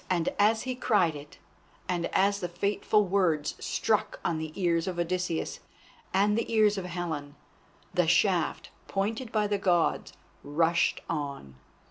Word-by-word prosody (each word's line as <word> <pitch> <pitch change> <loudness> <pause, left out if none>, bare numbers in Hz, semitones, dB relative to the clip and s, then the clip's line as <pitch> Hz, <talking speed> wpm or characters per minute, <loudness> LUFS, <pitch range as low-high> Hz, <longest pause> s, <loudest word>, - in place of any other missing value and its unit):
And 175 -3 +1
as 220 +2 +3
he 255 - -2
cried 205 -10 +2
it, 145 0 -11 0.5
and 175 -2 -1
as 200 +1 +2
the 180 - -2
fateful 200 +3 +1
words 175 -6 +1
struck 215 -1 0
on 165 -2 0
the 160 -1 -5
ears 170 -1 +1
of 180 -2 -3
Odysseus 175 -1 -2 0.5
and 205 +2 +3
the 230 +1 -2
ears 215 -2 +4
of 190 -2 -4
Helen, 165 -5 -4 0.6
the 180 -2 +2
shaft, 175 0 +2 0.2
pointed 220 +5 -2
by 215 -2 +1
the 205 -1 0
Gods, 180 -4 +1 0.3
rushed 165 +4 +1
on. 140 - -4
180 Hz, 145 wpm, -28 LUFS, 165-205 Hz, 0.6 s, ears